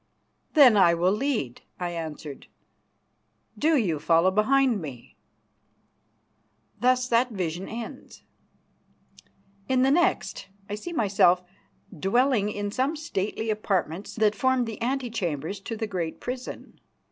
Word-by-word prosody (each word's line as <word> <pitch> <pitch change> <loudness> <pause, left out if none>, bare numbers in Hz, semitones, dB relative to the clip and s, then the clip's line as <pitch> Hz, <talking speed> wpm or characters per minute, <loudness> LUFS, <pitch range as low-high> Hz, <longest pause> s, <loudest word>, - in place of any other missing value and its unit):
"Then 260 -8 +8
I 170 -3 +5
will 175 +2 +2
lead," 215 - -2 0.2
I 175 -1 -2
answered, 155 -4 -7 1.1
"do 310 +1 +2
you 175 - 0
follow 165 +4 +3
behind 235 +2 +2
me." 130 -7 -9 1.6
Thus 255 0 +2
that 240 +2 +3
vision 180 -4 -4
ends. 230 0 -8 1.5
In 260 -1 +3
the 270 - +4
next 345 - +1 0.2
I - - -6
see 215 +12 -5
myself 195 - +3 0.5
dwelling 210 - +2
in 205 -1 -3
some 265 +8 0
stately 220 -6 -3
apartments 195 -3 -2
that 215 -2 +3
formed 260 +3 +1
the 225 -2 -7
antechambers 215 - -2
to 225 +3 -6
the 220 - -2
great 180 -6 -4
prison. 250 0 -7
210 Hz, 120 wpm, -26 LUFS, 180-255 Hz, 1.6 s, Then